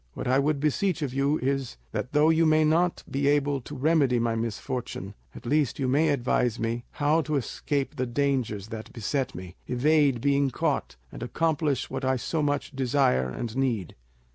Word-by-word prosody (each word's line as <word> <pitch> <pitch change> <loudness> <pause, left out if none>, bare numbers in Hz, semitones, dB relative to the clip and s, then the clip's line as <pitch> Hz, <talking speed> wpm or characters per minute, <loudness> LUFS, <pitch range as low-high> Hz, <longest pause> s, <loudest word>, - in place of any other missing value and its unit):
What - - -4
I 130 +2 +3
would 145 +1 +1
beseech 160 +3 0
of 135 -3 -3
you 140 +3 +1
is, 135 - -1
that 125 - -3
though 150 +2 +4
you 160 0 +3
may 155 0 +4
not 170 +3 +2
be 140 +1 -1
able 145 -1 +2
to 145 - -9
remedy 140 -3 +3
my 115 -1 +1
misfortune, 115 +3 -4 0.2
at - - -11
least 145 -1 +1
you 135 - -1
may 150 +5 +3
advise 125 -4 +1
me 115 +1 -2
how 150 +3 +2
to 155 -1 -2
escape 140 +2 -2
the 130 0 -1
dangers 120 -6 -1
that 110 -2 -7
beset 130 - -2
me, 90 +1 -9
evade 140 0 +3
being 140 +1 +2
caught, 115 - -1 0.2
and - - -9
accomplish 155 -5 0
what 135 0 -4
I 130 0 +2
so 155 +5 -2
much 145 -1 -1
desire 125 - +2
and 115 - -5
need." 120 -10 -1
135 Hz, 185 wpm, -27 LUFS, 120-150 Hz, 0.2 s, though